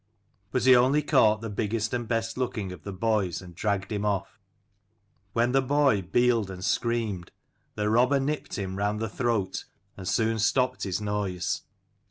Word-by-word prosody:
But 125 - 0
he 130 -1 +8
only 130 +5 +4
caught 110 -7 +4
the 115 - -4
biggest 110 +2 -1
and 120 -2 -2
best 115 0 -1
looking 115 -7 -2
of 90 - -9
the 100 - -6
boys, 100 -3 0
and 90 -2 -11
dragged 100 +2 -2
him 105 -1 -2
off. 105 0 -2 0.9
When 120 +1 +2
the 135 +1 +3
boy 135 -5 +3
bealed 115 +1 +2
and 95 -1 -6
screamed, 115 -7 -1 0.5
the 105 0 -1
robber 125 +6 +4
nipped 145 +3 -3
him 95 -1 -4
round 105 +1 0
the 110 - -1
throat, 115 -3 -1 0.3
and 95 -2 -8
soon 110 +2 +1
stopped 125 +4 +1
his 95 +1 -2
noise. 105 -4 -2
110 Hz, 170 wpm, -27 LUFS, 100-120 Hz, 0.9 s, he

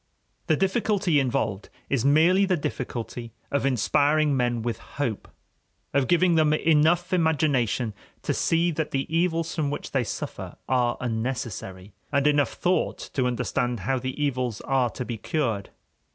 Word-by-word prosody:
The 155 - +4
difficulty 195 -2 +1
involved 115 -6 -1 0.2
is 135 -4 0
merely 160 +7 +5
the 185 -2 +1
difficulty 120 -4 -5 0.2
of 140 -1 +1
inspiring 145 +4 +2
men 120 -2 0
with 120 -1 -2
hope, 120 -7 -4 0.7
of 140 -2 +2
giving 175 0 +4
them 155 -2 +4
enough 165 +3 +3
imagination 145 - +1 0.3
to - - 0
see 170 +1 +2
that 155 -1 -2
the 135 0 -1
evils 165 -1 +1
from 155 -4 -1
which 145 - -5
they 135 -3 +1
suffer - - -6
are 125 -2 +1
unnecessary, 110 -5 -4 0.2
and 140 -1 +2
enough 145 -1 +3
thought 180 +1 -1
to 130 -2 +1
understand 120 -1 -1
how 135 +3 0
the 130 +3 -5
evils 125 -6 -1
are 130 -2 +1
to 125 - -6
be 120 -3 -5
cured. 115 -7 -1
140 Hz, 150 wpm, -25 LUFS, 120-160 Hz, 0.7 s, merely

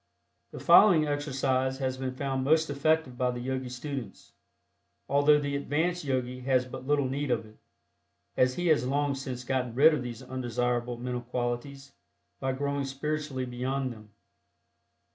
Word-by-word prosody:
The - - -9
following 175 -7 +7
exercise 135 -3 0
has 130 -1 -1
been 130 -1 -4
found 135 -1 -2
most 155 +2 +3
effective 145 -2 +1
by 125 -1 +2
the 125 0 -3
Yogi 130 +1 -3
students, 125 -3 -7 0.7
although 145 +1 +5
the 145 -1 -2
advanced 160 +5 -1
Yogi 125 -2 -2
has 130 0 +1
but 130 +1 -9
little 145 -2 +2
need 140 +2 -2
of 115 -2 0
it, 110 0 -18 0.8
as 130 0 +3
he 175 - -2
has 125 -6 +3
long 145 +1 +1
since 130 -2 -5
gotten 125 -2 -2
rid 155 +5 +7
of 150 - -1
these 120 -2 -6
undesirable 120 -1 -2
mental 125 0 -3
qualities 125 +3 -4 0.5
by 135 0 -1
growing 140 +1 -2
spiritually 140 -1 -3
beyond 130 +1 -2
them. 110 -1 -15
130 Hz, 155 wpm, -29 LUFS, 125-145 Hz, 0.8 s, following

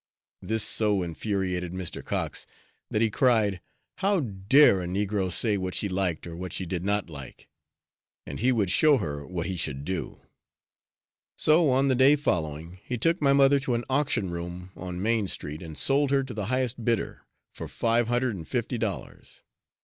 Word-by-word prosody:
This 110 0 -1
so 105 -4 +1
infuriated 90 0 -2
Mr. 95 -2 -5
Cox - - -3 0.4
that 110 - +1
he 110 - +1
cried, 105 -7 +2 0.4
"How 195 -1 +2
dare 100 0 +4
a 90 - -4
negro 95 0 -1
say 105 +2 +1
what 95 -1 -3
she 105 - 0
liked 90 -4 -1
or 85 -1 -7
what 90 0 -6
she 95 - -3
did 85 0 -3
not 100 +1 0
like; 70 -5 -10 0.8
and - - -6
he 125 +3 +3
would 105 -7 +1
show 150 +6 +5
her 75 - -4
what 90 -2 -3
he 95 - -3
should 70 -4 -3
do." 95 -1 -4 1.2
So, 155 0 +4
on 135 +2 +3
the 135 - +3
day 130 +3 +6
following, 85 - -2
he 125 - -3
took 165 +9 +1
my 140 -1 +4
mother 140 0 +5
to 130 -3 -1
an 120 - -2
auction 130 -9 0
room 85 +2 -6
on 90 0 -6
Main 110 -2 +1
Street 75 -3 -5
and 80 -3 -9
sold 140 +1 +3
her 135 0 +2
to 130 -2 -7
the 105 -3 -4
highest 130 -1 -1
bidder, 115 -1 -1 0.3
for - - -7
five 115 0 +1
hundred 120 -1 0
and 80 -4 -8
fifty - - -2
dollars. - - -5
105 Hz, 180 wpm, -27 LUFS, 90-130 Hz, 1.2 s, day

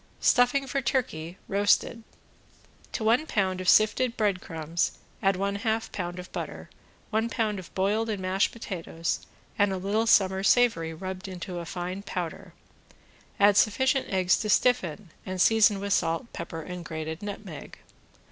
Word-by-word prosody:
~STUFFING 245 +3 +3
FOR 275 +1 -1
TURKEY 190 - -2
(ROASTED)~ 205 +3 +2 0.9
To 225 - -2
one 235 +8 +3
pound 190 -6 0
of 185 - +1
sifted 235 +3 +4
breadcrumbs 170 -6 -1 0.3
add 195 0 +3
one 200 +2 -1
half 225 +1 -1
pound 175 -2 -4
of 180 0 -8
butter, - - -6 0.4
one 220 +2 +1
pound 215 -4 -1
of 185 - -11
boiled 210 +4 +1
and 210 -3 -2
mashed 185 +1 +1
potatoes 170 -6 -4 0.4
and 205 -1 +4
a 190 - -1
little 205 +5 0
summer 190 -3 +4
savory 195 -6 +3
rubbed 185 +2 -6
to 180 -1 -5
a 170 - -7
fine 180 +3 -4
powder, 180 -4 -5 0.8
add 205 0 +6
sufficient 260 +6 +2
eggs 185 -2 +2
to 215 - -3
stiffen 205 -6 +1
and 185 -1 -5
season 215 0 +5
with 200 0 -1
salt, 165 +7 0
pepper 165 -1 -6
and 180 0 -7
grated 160 0 -5
nutmeg. 200 -5 -8
195 Hz, 150 wpm, -27 LUFS, 180-220 Hz, 0.9 s, add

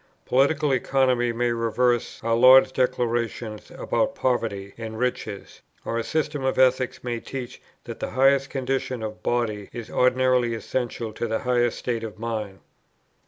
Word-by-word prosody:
Political 140 +3 +2
Economy 130 -2 +2
may 120 +1 0
reverse 120 +1 0
our 115 0 +1
Lord's 130 +3 +7
declarations 120 -3 -1
about 270 +10 -1
poverty 110 -6 -1
and 110 -1 -7
riches, 110 -4 -4 0.2
or 115 - -1
a - - -2
system 150 0 -2
of 130 - 0
Ethics 130 -1 +2
may 120 -1 -2
teach 125 0 -7 0.2
that - - -8
the - - -3
highest 135 +1 +3
condition 130 -2 -2
of 110 0 -6
body 110 -4 -1
is 120 -2 -8
ordinarily 125 -2 +2
essential 115 -1 -3
to 120 - -3
the 110 0 0
highest 120 -1 +1
state 115 -2 -3
of 110 -2 -7
mind. 110 -4 -4
120 Hz, 150 wpm, -24 LUFS, 115-130 Hz, 0.2 s, Lord's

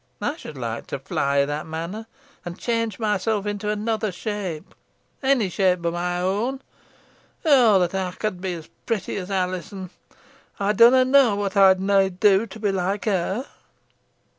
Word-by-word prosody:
Ey - - -2
should - - -10
like - - -5
to - - -4
fly 140 0 0
i' - - +2
that 145 +2 -4
manner, 170 +8 -5 0.4
an 175 -1 -6
change 230 +1 -2
myself 210 -1 0
into 205 0 -3
another 215 0 -1
shape 185 -4 -5 0.5
onny 265 -6 +2
shape 180 -2 +1
boh 170 - 0
my 175 +1 -2
own. 210 +9 -1 0.9
Oh 250 -9 +6
that 175 - -7
ey 185 -1 -2
could 210 -5 -3
be 185 -2 -2
os 160 - -11 0.2
protty 205 -3 -2
os 180 - -9
Alizon! 185 0 -3 0.7
Ey 200 +1 +1
dunna 245 +5 +6
knoa 260 -5 +5
whot 200 0 -2
ey'd 190 -1 +6
nah 195 0 +3
do 195 +3 +3
to 220 +2 -11
be 205 -2 0
like 195 +2 -2
her!" 200 +4 -1
195 Hz, 165 wpm, -23 LUFS, 180-220 Hz, 0.9 s, Oh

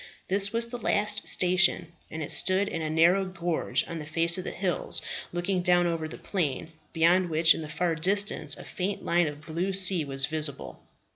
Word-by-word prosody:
This 200 +1 +2
was 230 0 +2
the 245 0 -6
last 210 -1 +1
station, 180 -2 +3 0.2
and 160 -2 -5
stood 190 +2 +3
in 165 - -5
a 155 - -3
narrow 170 +5 +3
gorge 175 -3 -2
on 170 - -6
the 150 - -9
face 165 +2 +2
of - - -5
the - - -4
hills 185 -2 -2 0.3
looking 180 +2 -2
down 175 0 +3
over 165 -2 -2
the - - -10
plain, 160 -4 -4 0.2
beyond 175 +2 +2
which 160 +1 +4
in - - -6
the 155 - -8
far 165 +2 -1
distance 180 -3 0
a - - -10
faint 195 +2 -5
line 175 -1 +1
of 145 0 -7
blue 170 +5 -3
sea 185 -3 +2
was 135 -1 +3
visible. 155 -2 -5
175 Hz, 195 wpm, -26 LUFS, 160-190 Hz, 0.3 s, which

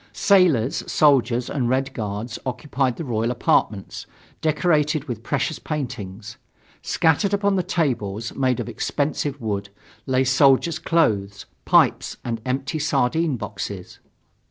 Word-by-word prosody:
Sailors, 170 - +3
soldiers 125 -5 +3
and 125 -4 -1
Red 135 +1 0
Guards 110 +1 -4
occupied 130 0 -1
the 165 - -6
royal 115 -2 -1
apartments, 110 -4 0 0.3
decorated 155 -2 +1
with 120 -7 -6
precious 140 +5 -2
paintings. 115 -7 -6 0.4
Scattered 170 +5 +2
upon 200 0 +1
the 185 - +2
tables, 115 - -2
made 130 -3 0
of - - -3
expensive 145 -1 -2
wood, 100 -4 -3 0.4
lay 130 0 +2
soldiers' 135 +4 +3
clothes, 105 - 0 0.2
pipes - - +3
and 115 -2 -3
empty 135 +4 -2
sardine 150 0 +1
boxes. 100 -4 -6
130 Hz, 120 wpm, -22 LUFS, 115-150 Hz, 0.4 s, Sailors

